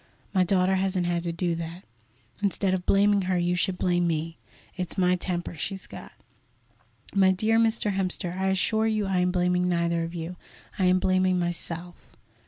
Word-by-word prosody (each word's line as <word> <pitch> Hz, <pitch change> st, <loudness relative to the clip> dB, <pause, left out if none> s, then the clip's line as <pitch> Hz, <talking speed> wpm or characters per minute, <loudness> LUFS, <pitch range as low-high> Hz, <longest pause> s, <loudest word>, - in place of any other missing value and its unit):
My 185 Hz, -2 st, +4 dB
daughter 185 Hz, +1 st, +2 dB
hasn't 190 Hz, -1 st, 0 dB
had 175 Hz, -1 st, 0 dB
to 170 Hz, -, -1 dB
do 170 Hz, 0 st, -1 dB
that. 165 Hz, +2 st, -6 dB, 0.6 s
Instead 195 Hz, -1 st, +1 dB
of 185 Hz, -1 st, -3 dB
blaming 200 Hz, 0 st, +4 dB
her, 185 Hz, -, +2 dB
you 175 Hz, 0 st, +1 dB
should 180 Hz, +1 st, -1 dB
blame 175 Hz, -1 st, +1 dB
me. 165 Hz, 0 st, -2 dB, 0.4 s
It's 180 Hz, -1 st, -5 dB
my 180 Hz, -1 st, +3 dB
temper 175 Hz, -1 st, -3 dB
she's 190 Hz, +4 st, -4 dB
got." -, -, -10 dB, 1.0 s
"My 190 Hz, -1 st, +5 dB
dear 220 Hz, +4 st, +2 dB
Mr. 225 Hz, -2 st, +1 dB
Hemster, 185 Hz, -2 st, -1 dB
I 190 Hz, +1 st, -1 dB
assure 220 Hz, +3 st, +1 dB
you 215 Hz, -2 st, 0 dB
I 190 Hz, -1 st, 0 dB
am 180 Hz, 0 st, +2 dB
blaming 180 Hz, 0 st, +1 dB
neither 170 Hz, -1 st, +1 dB
of 165 Hz, +1 st, -6 dB
you; 170 Hz, +2 st, -5 dB, 0.4 s
I 190 Hz, -, +3 dB
am 180 Hz, 0 st, +4 dB
blaming 185 Hz, 0 st, +2 dB
myself." 175 Hz, 0 st, -5 dB
180 Hz, 180 wpm, -26 LUFS, 175-190 Hz, 1.0 s, My